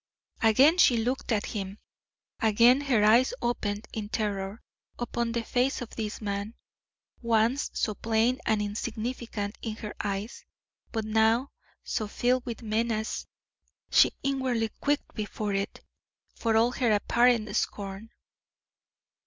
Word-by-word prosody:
Again 265 Hz, +10 st, +5 dB
she 245 Hz, -8 st, +6 dB
looked 245 Hz, +3 st, -1 dB
at 210 Hz, -2 st, +1 dB
him, 195 Hz, -1 st, -5 dB, 0.6 s
again 230 Hz, +5 st, +5 dB
her 250 Hz, -7 st, +2 dB
eyes 235 Hz, -, +5 dB
opened 215 Hz, -3 st, -2 dB
in 210 Hz, -2 st, -4 dB
terror 205 Hz, -1 st, -3 dB, 0.3 s
upon 235 Hz, -1 st, -2 dB
the 235 Hz, 0 st, -1 dB
face 255 Hz, +4 st, 0 dB
of 245 Hz, -3 st, -7 dB
this 215 Hz, -2 st, -4 dB
man, 205 Hz, +1 st, -4 dB, 0.7 s
once 235 Hz, +3 st, +2 dB
so 215 Hz, -, 0 dB
plain 225 Hz, +4 st, +1 dB
and 215 Hz, -1 st, +2 dB
insignificant 215 Hz, 0 st, -4 dB
in 220 Hz, -2 st, -4 dB
her 215 Hz, -2 st, -7 dB
eyes, 200 Hz, +3 st, -4 dB, 0.5 s
but 220 Hz, -2 st, -2 dB
now 220 Hz, +4 st, +2 dB, 0.3 s
so 215 Hz, -, -2 dB
filled 250 Hz, +4 st, 0 dB
with 235 Hz, 0 st, -5 dB
menace 220 Hz, 0 st, -1 dB, 0.6 s
she -, -, +6 dB
inwardly 260 Hz, -5 st, 0 dB
quaked 290 Hz, 0 st, 0 dB
before 210 Hz, -1 st, -3 dB
it, 195 Hz, 0 st, -3 dB, 0.5 s
for 225 Hz, -1 st, +1 dB
all 235 Hz, +2 st, +4 dB
her 245 Hz, -2 st, +1 dB
apparent 235 Hz, +1 st, +2 dB
scorn. 200 Hz, +2 st, -3 dB
225 Hz, 130 wpm, -28 LUFS, 210-240 Hz, 0.7 s, she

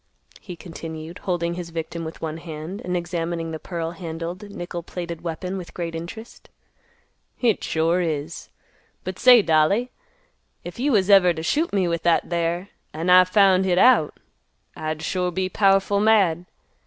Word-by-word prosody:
he 180 Hz, -4 st, -9 dB
continued, 165 Hz, -1 st, -8 dB
holding 170 Hz, -2 st, -2 dB
his 175 Hz, -1 st, -6 dB
victim 165 Hz, 0 st, -5 dB
with 160 Hz, 0 st, -8 dB
one 160 Hz, 0 st, -3 dB
hand, 165 Hz, +3 st, -7 dB
and 180 Hz, 0 st, -1 dB
examining 170 Hz, -1 st, -3 dB
the 160 Hz, -, -5 dB
pearl 165 Hz, -1 st, -4 dB
handled, 170 Hz, +3 st, -6 dB
nickel 175 Hz, -3 st, -6 dB
plated 170 Hz, -1 st, -6 dB
weapon 175 Hz, +3 st, -4 dB
with 175 Hz, -, -11 dB
great 170 Hz, -2 st, -4 dB
interest. 180 Hz, +8 st, -9 dB, 0.9 s
"Hit 235 Hz, -5 st, +1 dB
sure 165 Hz, +3 st, +1 dB
is. 160 Hz, -1 st, -4 dB, 0.5 s
But 185 Hz, 0 st, -6 dB
say, 245 Hz, -4 st, +7 dB
dolly, 170 Hz, +10 st, +2 dB, 0.7 s
if 175 Hz, +5 st, -9 dB
you 285 Hz, +3 st, +1 dB
was 205 Hz, -4 st, +3 dB
ever 180 Hz, -3 st, +6 dB
t' 160 Hz, -, -5 dB
shoot 310 Hz, -, 0 dB
me 190 Hz, -3 st, +1 dB
with 170 Hz, -1 st, -1 dB
that 170 Hz, +1 st, +1 dB
there, 170 Hz, +2 st, -1 dB, 0.3 s
an' 165 Hz, +3 st, 0 dB
I 185 Hz, 0 st, +8 dB
found 190 Hz, 0 st, +4 dB
hit 180 Hz, -2 st, +1 dB
out, 235 Hz, -8 st, +4 dB, 0.6 s
I'd 155 Hz, 0 st, -4 dB
sure 180 Hz, +2 st, -1 dB
be 185 Hz, +1 st, -2 dB
powerful 195 Hz, +1 st, +3 dB
mad. 195 Hz, -6 st, +3 dB
175 Hz, 160 wpm, -23 LUFS, 165-190 Hz, 0.9 s, I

